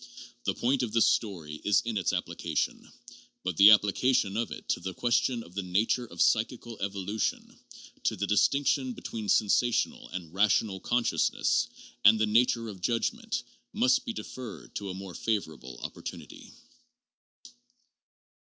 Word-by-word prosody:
The -, -, 0 dB
point 130 Hz, +2 st, +1 dB
of 120 Hz, -4 st, -3 dB
this 115 Hz, -, +5 dB
story 85 Hz, -9 st, -1 dB
is 105 Hz, -1 st, +3 dB
in 115 Hz, -1 st, -2 dB
its 95 Hz, -4 st, +1 dB
application; -, -, -3 dB, 0.5 s
but 90 Hz, -2 st, -2 dB
the 100 Hz, +1 st, +9 dB
application 105 Hz, +1 st, +3 dB
of 115 Hz, +1 st, -1 dB
it -, -, -9 dB
to -, -, +1 dB
the 95 Hz, -1 st, -6 dB
question 120 Hz, 0 st, +1 dB
of 85 Hz, -, -16 dB
the 100 Hz, -, -2 dB
nature 105 Hz, +7 st, 0 dB
of -, -, 0 dB
psychical 115 Hz, 0 st, 0 dB
evolution, 100 Hz, +1 st, -3 dB, 0.5 s
to -, -, +1 dB
the 100 Hz, -, -2 dB
distinction 130 Hz, +4 st, +2 dB
between 110 Hz, -3 st, -6 dB
sensational 115 Hz, +3 st, +2 dB
and 85 Hz, -3 st, -7 dB
rational 100 Hz, 0 st, +2 dB
consciousness, 120 Hz, +4 st, +1 dB, 0.4 s
and 105 Hz, +2 st, +8 dB
the 110 Hz, -, +3 dB
nature 115 Hz, +1 st, +2 dB
of 100 Hz, -4 st, -9 dB
judgment 225 Hz, -, -1 dB, 0.3 s
must 250 Hz, +4 st, +3 dB
be 245 Hz, -, -4 dB
deferred 125 Hz, -, -8 dB
to 100 Hz, -1 st, -5 dB
a 90 Hz, -, -5 dB
more 95 Hz, -1 st, -8 dB
favorable 80 Hz, -, -3 dB
opportunity. -, -, -8 dB
110 Hz, 145 wpm, -29 LUFS, 95-120 Hz, 0.5 s, the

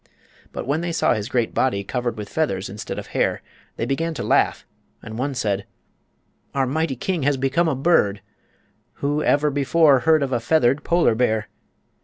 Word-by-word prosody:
But -, -, -5 dB
when 145 Hz, +5 st, 0 dB
they 175 Hz, 0 st, -2 dB
saw 165 Hz, -, +2 dB
his 110 Hz, -2 st, -3 dB
great 120 Hz, -3 st, 0 dB
body 100 Hz, -7 st, +1 dB
covered 120 Hz, +1 st, -3 dB
with 105 Hz, -1 st, -6 dB
feathers 100 Hz, -10 st, -2 dB
instead 105 Hz, +2 st, -6 dB
of -, -, -5 dB
hair -, -, 0 dB, 0.3 s
they -, -, -2 dB
began 160 Hz, +4 st, -2 dB
to -, -, -4 dB
laugh, -, -, +1 dB, 0.4 s
and 110 Hz, -, -8 dB
one 135 Hz, +3 st, -2 dB
said: 100 Hz, -5 st, -1 dB, 0.9 s
"Our 135 Hz, -1 st, +2 dB
mighty 150 Hz, +1 st, -1 dB
king 175 Hz, +7 st, -2 dB
has 140 Hz, 0 st, +1 dB
become 135 Hz, +6 st, +1 dB
a 155 Hz, -, +1 dB
bird! 130 Hz, -, +2 dB, 0.7 s
Who 145 Hz, +2 st, -1 dB
ever 150 Hz, 0 st, +2 dB
before 145 Hz, 0 st, +4 dB
heard 155 Hz, +1 st, +3 dB
of 135 Hz, -1 st, -2 dB
a 120 Hz, -, +1 dB
feathered 130 Hz, +1 st, +2 dB
polar 170 Hz, -8 st, +3 dB
bear?" 110 Hz, -2 st, 0 dB
135 Hz, 180 wpm, -22 LUFS, 115-155 Hz, 0.9 s, before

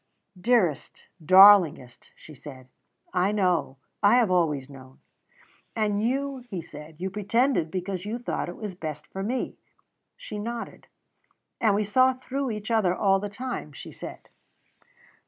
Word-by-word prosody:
"Dearest, 190 Hz, -, 0 dB, 0.2 s
darlingest," 185 Hz, -8 st, +6 dB
she 155 Hz, -, -14 dB
said, 130 Hz, -2 st, -12 dB, 0.5 s
"I 185 Hz, +2 st, +2 dB
know 180 Hz, -9 st, 0 dB, 0.2 s
I 205 Hz, +3 st, +5 dB
have 235 Hz, -6 st, +3 dB
always 150 Hz, -7 st, +1 dB
known." 130 Hz, -2 st, -14 dB, 0.8 s
"And 210 Hz, -2 st, 0 dB
you," 270 Hz, +3 st, -1 dB
he 240 Hz, -7 st, -7 dB
said, 150 Hz, 0 st, -11 dB
"you 190 Hz, +1 st, -3 dB
pretended 210 Hz, -, +1 dB
because 185 Hz, +1 st, -4 dB
you 215 Hz, +3 st, -4 dB
thought 245 Hz, -6 st, -4 dB
it 175 Hz, -, -7 dB
was 210 Hz, -4 st, -6 dB
best 155 Hz, -4 st, -7 dB
for 195 Hz, -, -7 dB
me." 245 Hz, +6 st, -3 dB, 0.6 s
She 210 Hz, -, -7 dB
nodded. 230 Hz, +2 st, -6 dB, 0.7 s
"And 215 Hz, -4 st, +3 dB
we 210 Hz, -, +1 dB
saw 255 Hz, +6 st, +3 dB
through 260 Hz, +1 st, -4 dB
each 210 Hz, 0 st, -5 dB
other 200 Hz, -6 st, +2 dB
all 195 Hz, -1 st, +2 dB
the 205 Hz, +1 st, -5 dB
time," 205 Hz, -, -6 dB
she -, -, -10 dB
said. -, -, -10 dB
200 Hz, 145 wpm, -26 LUFS, 165-230 Hz, 0.8 s, darlingest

